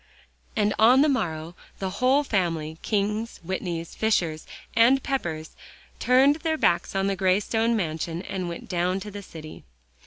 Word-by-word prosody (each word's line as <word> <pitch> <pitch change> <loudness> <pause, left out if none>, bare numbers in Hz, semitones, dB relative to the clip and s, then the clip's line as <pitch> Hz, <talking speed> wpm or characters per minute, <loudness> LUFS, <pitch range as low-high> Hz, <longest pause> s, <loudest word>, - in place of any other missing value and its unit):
And 210 -2 +2
on 250 +5 +6
the - - +3
morrow, 170 - -1 0.2
the 190 -1 -3
whole 265 +3 +4
family, 165 - -1
Kings, 210 +2 -1
Whitneys, 170 -2 -4
Fishers 170 -8 0 0.3
and 250 +4 +5
Peppers, 160 - -3 0.5
turned 265 +4 +4
their 320 0 -1
backs 175 - +1
on 195 0 +1
the 195 0 0
gray 190 0 +2
stone 225 +2 0
mansion 165 -2 -3
and 185 -2 -4
went 170 - -7
down 180 +1 0
to 210 +1 -7
the 205 0 -7
city. 155 -5 -11
195 Hz, 155 wpm, -25 LUFS, 170-230 Hz, 0.5 s, on